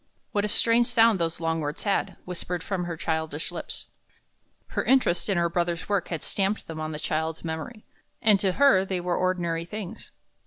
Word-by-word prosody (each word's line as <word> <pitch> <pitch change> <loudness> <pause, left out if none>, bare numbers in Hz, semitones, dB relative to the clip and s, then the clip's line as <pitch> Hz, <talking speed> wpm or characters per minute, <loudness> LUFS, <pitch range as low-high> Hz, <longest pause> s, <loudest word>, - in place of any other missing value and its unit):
'" - - -45
What 205 - +1
a - - +1
strange 230 +3 +4
sound 230 -4 +4
these 165 -1 -1
long 165 -1 0
words 150 +1 -3
had, 200 -2 0
whispered 180 -1 -3
from 185 -3 -2
her 170 -2 -4
childish 160 -1 -2
lips! - - -4 0.8
Her - - -1
interest 250 -9 +3
in 195 - +2
her 170 0 +3
brother's 170 -1 -1
work 200 -3 0
had 165 -3 -4
stamped 200 +1 -1
them 160 -1 -7
on 155 0 -3
the 150 - -4
child's 160 +2 -2
memory, 165 +8 -5 0.3
and 210 -3 +5
to 190 -1 +1
her 275 -6 +5
they 190 -1 -2
were 175 0 -1
ordinary 175 -3 0
things. 195 +1 -7
175 Hz, 195 wpm, -26 LUFS, 165-205 Hz, 0.8 s, and